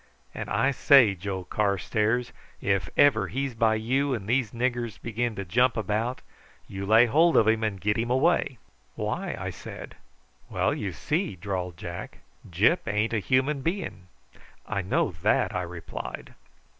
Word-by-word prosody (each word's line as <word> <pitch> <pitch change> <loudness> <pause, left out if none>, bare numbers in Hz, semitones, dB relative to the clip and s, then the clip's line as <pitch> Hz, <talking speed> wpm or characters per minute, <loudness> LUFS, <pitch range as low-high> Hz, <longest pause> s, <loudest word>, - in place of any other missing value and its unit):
And - - -6
I 135 - +2
say, 135 -5 +6
Joe 95 0 -5
Carstairs, 105 +5 0 0.3
if 100 -1 0
ever 110 -9 +5
he's 135 +7 -3
by 110 -1 +2
you 130 +5 0
and 100 -5 -6
these 120 -1 +1
niggers 120 -1 -2
begin 115 0 -2
to 100 - -5
jump 120 +7 +2
about, 110 +4 -1 0.5
you 100 0 -6
lay 110 +3 +6
hold 160 +8 +4
of 110 - +5
him 110 0 +2
and 105 -3 -1
get 105 +3 0
him 120 +1 -1
away." 135 0 +2 0.4
"Why?" - - -3
I - - -4
said. - - -9 0.6
"Well, - - 0
you 100 - -3
see," 160 - -2
drawled 90 -2 -4
Jack, 85 +1 -7 0.3
"Gyp 105 - +2
ain't 105 +2 0
a 110 - +2
human 130 +6 +1
being." 165 - -4 0.6
"I 100 - -2
know 95 +1 0
that," - - +2
I 90 - 0
replied. 85 -7 -7
110 Hz, 155 wpm, -26 LUFS, 100-130 Hz, 0.6 s, say